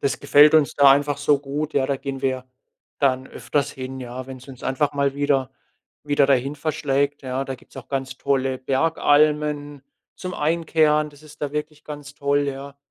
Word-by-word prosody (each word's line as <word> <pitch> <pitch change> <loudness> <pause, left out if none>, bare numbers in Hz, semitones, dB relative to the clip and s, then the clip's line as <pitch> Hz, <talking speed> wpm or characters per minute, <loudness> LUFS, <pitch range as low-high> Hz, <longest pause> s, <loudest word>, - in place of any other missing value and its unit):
Das 135 -2 -1
gefällt 150 +2 +6
uns 155 -3 +4
da 140 -1 +7
einfach 145 +1 +2
so 145 0 +3
gut, 145 +2 -4
ja, 135 -1 +2
da 140 - 0
gehen 135 0 -6
wir 130 -1 -1 0.6
dann 130 -2 +2
öfters 145 0 -2
hin, 130 0 -7
ja, 125 +1 -7
wenn 130 -1 -8
es 130 - -16
uns 130 -2 -11
einfach 145 +2 0
mal 140 -1 0
wieder 140 -2 +1 0.6
wieder 145 -1 +3
dahin 135 +1 +1
verschlägt, 145 -1 -1
ja? 130 +1 -2
Da 135 - -4
gibt's 130 - -19
auch 130 - -11
ganz 135 -1 -4
tolle 135 -1 0
Bergalmen 145 +1 +1 0.3
zum 185 -1 -6
Einkehren. 155 -1 +2
Das 145 0 -18
ist 155 0 -15
da 145 - -2
wirklich 150 0 -5
ganz 145 -1 -9
toll, 140 0 +1
ja. 140 0 -6
140 Hz, 185 wpm, -23 LUFS, 135-150 Hz, 0.6 s, da